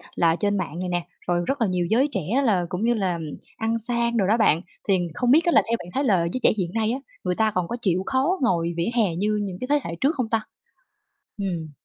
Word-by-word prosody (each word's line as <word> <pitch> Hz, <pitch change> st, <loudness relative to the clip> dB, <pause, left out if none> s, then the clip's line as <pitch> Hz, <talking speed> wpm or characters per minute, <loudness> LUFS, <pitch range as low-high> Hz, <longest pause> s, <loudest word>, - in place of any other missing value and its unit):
là 165 Hz, -1 st, +3 dB
trên 205 Hz, +2 st, 0 dB
mạng 170 Hz, -2 st, -4 dB
này 185 Hz, 0 st, -3 dB
nè, 175 Hz, -1 st, -1 dB, 0.2 s
rồi 175 Hz, 0 st, +1 dB
rất 275 Hz, -1 st, -1 dB
là 225 Hz, -, +3 dB
nhiều 180 Hz, -2 st, 0 dB
giới 255 Hz, +6 st, +3 dB
trẻ 195 Hz, -7 st, -1 dB, 0.2 s
là 195 Hz, -8 st, +2 dB
cũng 180 Hz, +5 st, -3 dB
như 240 Hz, +1 st, +3 dB
là 185 Hz, -6 st, -1 dB, 0.4 s
ăn 225 Hz, +1 st, 0 dB
sang 235 Hz, 0 st, +1 dB
đồ 200 Hz, -, +2 dB
đó 220 Hz, +3 st, +3 dB
bạn, 170 Hz, -8 st, +3 dB, 0.3 s
thì 190 Hz, -3 st, +3 dB
không 245 Hz, +7 st, +1 dB
biết 315 Hz, +5 st, +5 dB
á 345 Hz, -, +3 dB
là -, -, +6 dB
theo 230 Hz, -, +3 dB
bạn 175 Hz, -, -9 dB
thấy 275 Hz, -, 0 dB
là 205 Hz, -9 st, +3 dB
giới -, -, -1 dB
trẻ -, -, +6 dB
hiện 180 Hz, -3 st, -2 dB
nay 225 Hz, -1 st, +1 dB
á, 260 Hz, -, -2 dB, 0.2 s
người 180 Hz, -1 st, 0 dB
ta 220 Hz, -1 st, +2 dB
còn 180 Hz, -3 st, -1 dB
có 235 Hz, -, -3 dB
chịu 185 Hz, -4 st, +1 dB
khó 270 Hz, +8 st, +1 dB
ngồi 170 Hz, -8 st, +1 dB
vỉa 170 Hz, +5 st, 0 dB
hè 205 Hz, -8 st, +2 dB
như 210 Hz, +4 st, 0 dB
những 190 Hz, -3 st, -5 dB
cái 255 Hz, -, -3 dB
thế 295 Hz, 0 st, +4 dB
hệ 165 Hz, -, -4 dB
trước 290 Hz, +4 st, +2 dB
không 250 Hz, -5 st, -2 dB
ta? 225 Hz, -1 st, +1 dB, 1.0 s
Ừm. 170 Hz, -5 st, -3 dB
210 Hz, 265 wpm, -24 LUFS, 180-235 Hz, 1.0 s, là